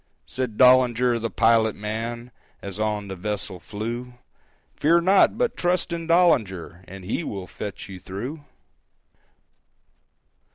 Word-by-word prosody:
Said 125 -4 -4
Dollinger, 125 -1 +5
the 115 0 -2
pilot 110 -1 +3
man, 115 +3 -5 0.3
As 100 0 -6
on 105 -1 -1
the 95 - -6
vessel 95 -1 -4
flew, 120 +6 -6 0.6
"Fear 170 +3 +3
not, 190 +5 +4
but 245 0 0
trust 175 0 0
in 165 -1 -4
Dollinger, 105 - +2
And 95 0 -10
he 110 - -2
will 100 -10 -5
fetch 100 +2 -7
you 95 -2 -9
through." 120 - -7
115 Hz, 125 wpm, -24 LUFS, 100-130 Hz, 0.6 s, Dollinger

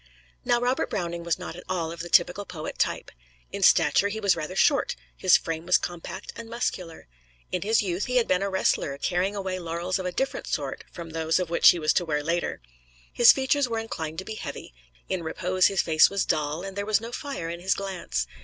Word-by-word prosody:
Now 240 - +2
Robert 250 +2 0
Browning 170 -2 -3
was 170 -1 0
not 180 -2 -7
at 180 - -10
all 170 -3 -1
of 170 - -8
the 175 +1 -6
typical 180 +3 +3
poet 160 -5 -7
type. - - -1 0.4
In - - -5
stature, 200 - +5
he 215 +2 -4
was 200 -3 +3
rather 165 +2 -5
short; - - +3 0.2
his - - +5
frame 165 +1 -5
was 180 - +6
compact 175 +2 -7
and 230 -1 -9
muscular. 185 - -4 0.4
In 180 - -1
his 220 +3 +2
youth, 180 0 -2
he 250 - -3
had 245 -2 +3
been 185 0 +2
a 200 - 0
wrestler 170 -7 0
carrying 185 +6 0
away 190 -2 -3
laurels 175 +2 -2
of 185 - -3
a - - -2
different 270 +9 -2
sort - - -3
from 165 -2 -8
those 160 0 0
which 170 -2 +5
he - - +4
was 155 -2 +2
to 180 - +2
wear 150 -2 -1
later. 170 - -2 0.5
His 240 - +8
features 270 0 +1
were 230 - -2
inclined 160 -8 -5
to 190 - -5
be 220 - -5
heavy; 215 - -7 0.3
in 185 -2 -2
repose 180 +3 +1
his 195 -2 +1
face 155 -2 +5
was 200 -1 -1
dull, 155 +2 -1
and 195 -1 -7
there 200 0 -3
was 215 0 +3
no 230 +1 -8
fire 270 - -5
in 170 - -6
his 190 +2 +1
glance. 195 -3 -3
180 Hz, 220 wpm, -26 LUFS, 165-200 Hz, 0.5 s, His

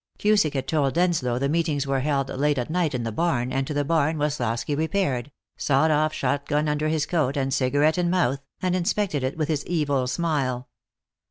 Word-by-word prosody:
Cusick 205 -8 +2
had 135 -1 -2
told 145 -3 +1
Denslow 165 -9 +1
the 140 +2 0
meetings 155 -2 0
were 135 -1 0
held 135 -1 0
late 145 +2 0
at 125 +4 -2
night 165 -5 0
in 120 - -2
the 115 - -3
barn, 130 -3 0
and 135 0 -1
to - - -3
the 145 0 0
barn 160 0 +1
Woslosky 145 -3 -1
repaired, 150 -5 -1 0.3
sawed 145 +3 +2
off 155 +1 +2
shotgun 145 +2 -1
under 150 +1 0
his 155 -1 0
coat 150 -5 0
and 135 -1 0
cigarette 145 +6 +2
in 175 -1 +1
mouth, 170 -7 +1 0.2
and 180 -1 +1
inspected 180 -4 0
it 130 +3 -2
with 155 -2 0
his 155 -3 -1
evil 145 -6 0
smile. 130 -5 -1
145 Hz, 195 wpm, -24 LUFS, 135-160 Hz, 0.3 s, Cusick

